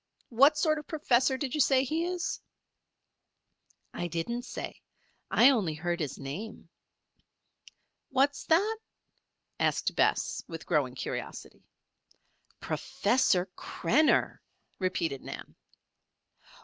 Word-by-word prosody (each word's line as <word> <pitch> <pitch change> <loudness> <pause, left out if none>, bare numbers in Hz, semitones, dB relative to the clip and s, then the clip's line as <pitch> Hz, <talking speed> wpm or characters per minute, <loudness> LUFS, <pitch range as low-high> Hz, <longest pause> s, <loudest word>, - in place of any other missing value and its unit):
What 275 +6 +5
sort 310 -1 +2
of 300 - -12
professor 265 -4 +2
did 260 -1 -3
you 300 - +2
say 265 0 +4
he 315 +5 -1
is?" 360 0 -3 1.5
"I 175 - -3
didn't 175 +9 -3
say. - - -7 0.5
I 265 - +6
only 195 - 0
heard 175 +2 -2
his 150 -5 -3
name." 175 +12 -7 1.4
"What's 275 +2 +1
that?" 405 +7 +3 0.8
asked - - +1
Bess, - - +1
with - - -8
growing - - +1
curiosity. - - -6 1.0
"Professor 190 -8 +1
Krenner," 280 - +1 0.4
repeated 165 -7 -1
Nan. - - -8
255 Hz, 100 wpm, -29 LUFS, -, 1.5 s, I